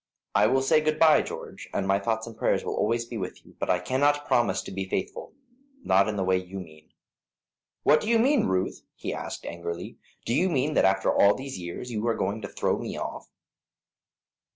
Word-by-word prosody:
"I 105 +1 +5
will 130 +3 +2
say 155 +3 +4
good 155 0 0
bye, 155 -2 +6
George, - - -8
and 95 - 0
my 95 0 +3
thoughts 110 +2 -1
and 115 -1 -9
prayers - - 0
will - - -2
always 115 +2 0
be 120 -1 -6
with 90 - -6
you, - - -18
but - - -3
I 90 - +4
cannot 145 +9 +1
promise 110 -6 +2
to - - -8
be 95 0 -4
faithful 95 - -4 0.5
not 95 +2 +4
in 105 - -2
the 95 - 0
way 95 0 +2
you 90 +1 -6
mean." 80 -3 -13 0.9
"What 150 - +5
do 215 - -3
you 230 - +5
mean, 265 +3 +3
Ruth?" 95 0 -1
he - - -4
asked, - - -6
angrily. 85 +1 -6 0.3
"Do 115 - 0
you 185 +8 +2
mean 150 -1 0
that - - +4
after 95 0 +2
all 100 0 +5
these 135 -6 -6
years 90 +8 -6
you 110 0 -2
are 115 - +2
going 100 +3 -2
to 100 - -5
throw - - -1
me - - -5
off?" - - -6
110 Hz, 215 wpm, -27 LUFS, 95-135 Hz, 0.9 s, bye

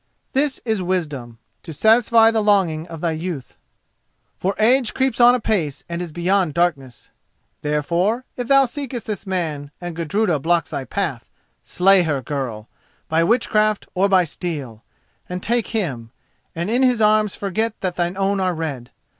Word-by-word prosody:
This 275 +1 0
is 220 -4 0
wisdom: 150 -10 -3 0.2
to 165 - -9
satisfy 225 +4 +5
the 225 -1 +1
longing 185 -6 +2
of 165 -2 -9
thy 170 - 0
youth; 160 -4 -5 0.8
for 195 +2 -2
age 240 +2 +3
creeps 260 -2 +1
on 245 +1 +7
apace 185 - -1
and 170 0 -4
beyond 180 +2 +1
is - - -9
darkness. 140 -8 -1 0.5
Therefore, 170 - 0
if 245 -1 -4
thou 275 0 +5
seekest 255 -2 -6
this 210 -1 -5
man, 160 -6 -3
and 175 -2 -6
Gudruda 170 +1 0
blocks 165 +1 0
thy 135 - -4
path, 160 -12 -3 0.3
slay 185 +8 +4
her, 155 -5 0
girl—by 130 +4 -4
witchcraft 215 +1 +2
or 195 +2 +2
by 190 -2 +5
steel—and 160 - -8
take 235 +1 0
him, 140 - -3 0.5
and 170 +5 -2
in 245 +3 +2
his 250 -3 +3
arms 215 -1 +3
forget 215 +3 -2
that 185 -2 -2
thine 175 +1 -1
own 195 0 +1
are 185 -2 0
red. 140 -7 -4
180 Hz, 155 wpm, -21 LUFS, 155-215 Hz, 0.8 s, on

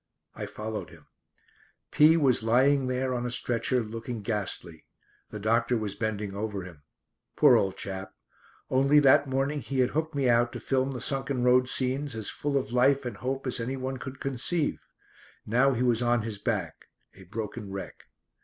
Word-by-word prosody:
I - - -6
followed 110 0 -6
him. - - -16 0.9
P 155 +2 +6
was 135 -7 +3
lying 130 +4 +3
there 130 0 -1
on 120 -1 -2
a 125 - -2
stretcher 120 0 0
looking 115 0 -6
ghastly. 100 -7 -4 0.4
The - - -7
doctor 115 +3 +1
was 105 -3 -3
bending 105 -3 -3
over 100 -2 -3
him. 85 -5 -12 0.5
Poor - - +6
old 95 -1 +1
chap. 95 -1 -5 0.6
Only 135 +3 +4
that 140 0 +5
morning 135 +3 0
he 130 +4 -5
had 130 -1 +2
hooked 160 0 -2
me 140 -2 +1
out 120 0 +3
to - - -5
film 130 0 0
the 125 - -5
sunken 135 -1 -1
road 125 0 +4
scenes 130 +1 -1
as 110 -2 -1
full 145 -1 -1
of 130 -4 -3
life 135 +2 +3
and 120 -4 -5
hope 130 +5 -3
as 130 - -2
anyone 130 +2 -3
could 130 +1 -8
conceive. 135 +4 -1 0.7
Now 125 +5 +3
he 125 0 -1
was 120 -2 +2
on 120 -2 +2
his 110 -3 -4
back, - - -3 0.3
a 95 - -15
broken 105 +2 -6
wreck. 95 0 -8
125 Hz, 175 wpm, -28 LUFS, 110-135 Hz, 0.9 s, P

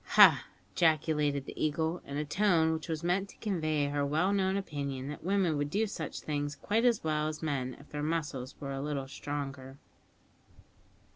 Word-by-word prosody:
"Ha!" - - +9 0.3
ejaculated 150 -4 +2
the - - -5
Eagle, 160 +3 0
in 140 - -4
a 150 - -1
tone 165 -1 +3
which 160 +1 -5
was 160 0 -2
meant 190 +3 +1
to - - -15
convey 155 -8 0
her 145 0 0
well 160 +7 +2
known 190 -1 +2
opinion 140 -7 -4
that 150 - -7
women 185 -4 +2
would 145 0 -1
do 210 +7 +1
such 165 -6 -5
things 145 -1 -2
quite 215 +10 0
as 235 -3 +3
well 155 -1 +1
as 155 0 -5
men 130 -5 -1
if 140 - -15
their 150 - -3
muscles 150 -5 -2
were 140 -1 -5
a 135 - -3
little 140 -2 -2
stronger. 140 -1 -5
150 Hz, 185 wpm, -31 LUFS, 145-170 Hz, 0.3 s, Ha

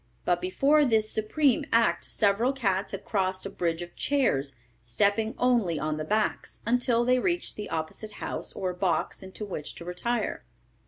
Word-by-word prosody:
But 175 0 +2
before 280 +11 +3
this 220 -5 +3
supreme 245 +5 +2
act 230 0 +3
several 220 +5 +2
cats 200 -7 0
had 195 0 -6
crossed 190 -2 -1
a - - -4
bridge 170 -1 -1
of 175 - -12
chairs, 140 - +1 0.3
stepping 200 - +1
only 235 -10 +2
on 155 0 -2
the 155 - -3
backs, 215 +7 -1
until 240 0 +2
they 250 +1 +4
reached 345 +6 -1
the 210 - -6
opposite 165 +7 -4
house - - -3
or 185 -1 -2
box 180 +1 -1
into 190 +2 -7
which 155 -7 -6
to 170 - -9
retire. 210 +8 -2
205 Hz, 165 wpm, -28 LUFS, 180-240 Hz, 0.3 s, they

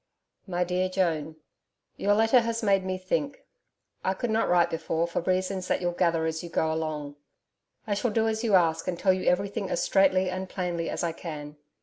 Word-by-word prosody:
MY 180 -1 0
DEAR 180 +1 0
JOAN, 160 -5 -1 0.6
Your 205 +1 +2
letter 225 +4 +5
has 230 0 -2
made 195 -2 +3
me 185 0 -2
think. 230 +10 -3 0.6
I 190 - 0
could 240 +3 -2
not 220 +1 +1
write 175 -1 +3
before 165 0 -1
for 170 - -2
reasons 185 +1 -1
that - - +1
you'll 175 -1 0
gather 170 -2 +1
as 160 0 -2
you 170 - -8
go 160 -1 0
along. 150 -2 -4 0.7
I 210 - -1
shall 210 +4 0
do 220 +1 +1
as 220 +1 -1
you 215 -4 +3
ask 165 -2 +2
and 180 -2 -1
tell 190 0 +3
you 185 - +1
everything 195 +2 -1
as - - 0
straightly 190 -1 +3
and 185 0 -4
plainly 175 -3 -2
as - - -3
I 170 - 0
can. 150 -3 -7
185 Hz, 205 wpm, -27 LUFS, 165-195 Hz, 0.7 s, letter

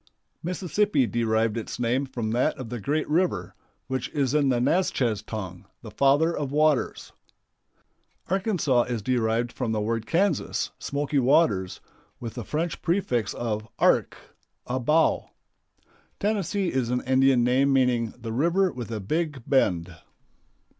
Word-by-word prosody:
Mississippi 185 -2 +1
derived 115 -1 0
its 115 - -5
name 125 +3 0
from 120 -4 -3
that 120 +2 +1
of 130 -4 -7
the 120 0 -4
great 150 +8 -1
river, 175 +4 0 0.3
which 130 -2 -3
is 140 -3 0
in 145 -2 +3
the 125 -2 +2
Natchez 125 - +1
tongue 95 -5 -7 0.2
"The - - -9
Father 145 +5 +3
of 140 -2 -3
Waters." 150 -2 +1 1.2
Arkansas 185 - +1
is 120 -4 -3
derived 120 0 0
from 120 -3 -3
the 110 - 0
word 110 +1 -2
Kansas, 180 -1 0
"smoky 145 0 -1
waters," 120 - +2 0.4
with 115 -2 -6
the 120 - -6
French 155 +3 -3
prefix 165 - 0
of 110 -2 -3
"ark," - - +2 0.5
a 130 +1 -2
bow. 155 +6 +2 0.9
Tennessee 200 -2 0
is 130 -3 0
an 125 0 0
Indian 130 -1 +3
name, 130 +3 +3
meaning 125 -4 +1
"the 115 -2 -6
river 170 +8 +2
with 120 -3 -7
a 110 -2 -3
big 145 - -2
bend." 90 -9 +1
130 Hz, 140 wpm, -26 LUFS, 115-155 Hz, 1.2 s, in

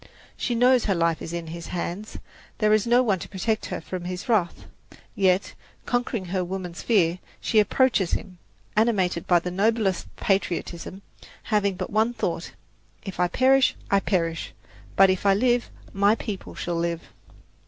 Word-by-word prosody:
She 240 - -2
knows 250 +1 +4
her 195 - +1
life 165 -1 +1
is - - -6
in 170 -1 -4
his 165 +1 -7
hands; 180 +4 -5 0.4
there 215 -1 +3
is 215 +1 +2
no 245 +2 +5
one 200 -6 +1
to - - -8
protect 215 +3 -1
her - - -4
from 180 -2 -6
his 180 +5 -5
wrath. 205 -8 0 0.5
Yet, 190 -1 +2 0.3
conquering 245 -5 -1
her 185 0 0
woman's 180 -1 -5
fear, 180 -6 +2 0.2
she 220 - +2
approaches 210 -3 +2
him, 180 -3 -4 0.4
animated 200 -6 +1
by 175 - +5
the 180 +1 -2
noblest 200 0 +1
patriotism, 190 -1 -2 0.4
having 205 -3 +1
but - - -5
one 220 +3 +2
thought: - - -3 0.5
"If 195 -3 -7
I 180 - +3
perish, 265 +6 +3 0.2
I 200 - +5
perish; 165 -4 -1 0.4
but 195 0 +6
if 185 - -2
I 200 -1 +4
live, 240 +2 +2 0.2
my 200 +2 +4
people 210 -4 -6
shall 175 -1 -3
live." 170 0 -2
195 Hz, 165 wpm, -25 LUFS, 175-220 Hz, 0.5 s, but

